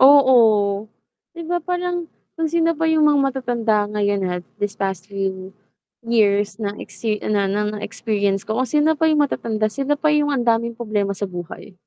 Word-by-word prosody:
Oo. 225 -7 +5 0.5
'Di 335 - -6
ba? 350 +2 -1
Parang, 355 0 -3 0.2
kung 325 -1 -2
sino 335 +1 +2
pa 325 0 -1
yung 315 -1 +3
mga 295 -2 +4
matatanda 240 -6 0
ngayon 205 -2 0 0.2
at - - -18
these 205 0 -2
past 190 -3 -3
few 195 -1 -4 0.5
years 205 -2 +1
na 205 -1 -3
exi 220 -2 -3
na 205 -2 +1
na 205 +2 0
na 210 - -5
experience 205 -3 -1
ko 220 +1 -2
kung 260 - +1
sino 300 +5 +3
pa 320 - +3
yung 305 -1 +3
matatanda 215 -5 -1
sila 275 +3 0
pa 305 +1 +1
yung 295 -1 +2
ang 245 - -1
daming 235 0 +1
problema 210 -4 -2
sa 205 - -3
buhay. 180 +2 -8
225 Hz, 180 wpm, -21 LUFS, 205-295 Hz, 0.5 s, Oo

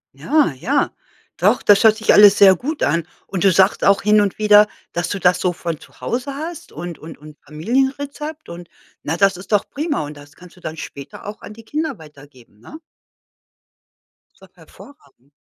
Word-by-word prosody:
Ja, 300 - +1
ja. 255 - -1 0.5
Doch, - - +2
das 205 +1 +5
hört 220 -1 +5
sich 220 - +2
alles 205 -1 +7
sehr 195 -2 +7
gut 290 - -4
an. 165 +3 0 0.2
Und 185 -3 -4
du 195 - +5
sagst 190 +2 +2
auch 200 0 +3
hin 210 0 +4
und 200 -2 -2
wieder, 210 0 +5 0.2
dass 175 0 -3
du 200 - -3
das 180 0 +2
so 180 - 0
von 170 -3 -5
zu - - -19
Hause 260 +3 -4
hast 320 +2 -7
und 170 +1 -8
und 160 +1 -11
und 150 0 -14
Familienrezept 270 - -3
und, 170 0 -10 0.3
na, 160 +3 -3
das 195 -1 +3
ist 185 - -13
doch 205 -2 +1
prima. 300 +2 -3
Und 150 +1 -9
das 145 0 -15
kannst 180 -1 -16
du 180 - -20
dann 160 0 -7
später 140 -2 -10
auch 205 +1 -8
an 210 - -10
die 225 +1 -14
Kinder 305 +3 -3
weitergeben, 140 -8 -17
ne? 310 - -12 1.6
Das - - -31
ist - - -17
doch - - -43
hervorragend. 280 - -19
195 Hz, 200 wpm, -19 LUFS, 160-250 Hz, 1.6 s, alles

